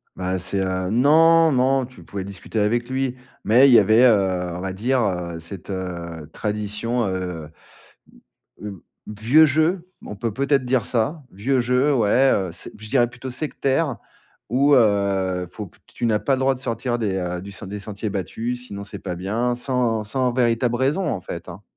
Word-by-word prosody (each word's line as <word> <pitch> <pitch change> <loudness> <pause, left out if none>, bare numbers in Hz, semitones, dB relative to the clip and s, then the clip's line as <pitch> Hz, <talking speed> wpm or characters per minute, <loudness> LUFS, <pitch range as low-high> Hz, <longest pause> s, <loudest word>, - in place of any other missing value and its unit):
Bah 95 0 -2
c'est, 95 +2 -2
heu, 95 0 -2
non, 160 +7 +5
non 130 0 +2
tu 125 +1 -15
pouvais 100 -1 -6
discuter 100 +3 -5
avec 120 +4 0
lui, 130 -1 -1 0.3
mais 125 +6 +6
il - - +6
y - - +9
avait, 110 +4 +5
heu, 95 -6 +3
on - - -5
va 95 0 -3
dire, 125 +7 0
heu, 90 -5 -2
cette, 85 +4 -10
heu, 85 -4 -5
tradition, 105 +3 -2
heu, 90 -5 -4 1.1
b - - -10
heu, 100 -5 -8 0.2
vieux 115 +10 +4
jeu, 160 +5 +1 0.2
on - - -7
peut 115 +2 -3
peut-être 140 +3 +1
dire 125 -3 +1
ça, 130 +7 -1
vieux 125 +7 0
jeu 125 +4 +2
ouais, 125 +3 +4
heu, 95 -2 -1
c'est 85 - -9
b - - -22
je 110 0 -9
dirais 120 -2 +3
plutôt 125 +2 -8
sectaire 140 0 -1 0.5
où, 140 +4 +4
heu, 100 -5 +2
faut 105 +2 -7
p - - -25
que, - - -42
tu - - -4
n'as 110 -2 +2
pas 135 - +1
le 130 - -3
droit 135 0 +3
de 125 - -11
sortir 120 0 -2
des, 105 -4 -1
heu, 90 -1 -3
du 100 +2 -9
des 100 +2 -6
sentiers 105 +1 -5
battus, 115 +6 -4
sinon 100 -2 -7
c'est 100 - -8
pas 90 -2 -5
bien 110 +7 -1
sans 120 -3 -1
sans 125 +3 0
véritable 120 -1 +1
raison 140 +9 0
en - - -2
fait, 85 -1 -7
hein. 95 +4 -9
110 Hz, 195 wpm, -22 LUFS, 95-130 Hz, 1.1 s, y